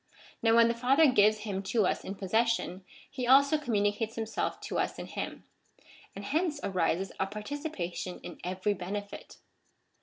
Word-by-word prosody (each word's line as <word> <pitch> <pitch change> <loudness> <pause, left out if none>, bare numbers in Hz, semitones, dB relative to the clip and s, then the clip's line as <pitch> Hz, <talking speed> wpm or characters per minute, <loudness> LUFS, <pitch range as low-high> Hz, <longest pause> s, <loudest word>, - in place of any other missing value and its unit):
Now 225 0 +4
when 230 0 +7
the 235 - +1
Father 265 +5 +4
gives 215 -1 +4
him 200 -3 -3
to 205 +1 +1
us - - 0
in 195 - -5
possession, 205 -1 0 0.2
he 255 -3 -4
also 280 +4 +6
communicates 215 -3 0
himself 225 -1 -2
to - - -3
us - - -1
in - - -6
him; - - -6 0.7
and 200 +1 -7
hence 305 - 0
arises 185 -1 0
a 190 - +1
participation 210 - -5
in - - -9
every 185 +3 -1
benefit. 200 +2 -6
210 Hz, 155 wpm, -30 LUFS, 195-245 Hz, 0.7 s, when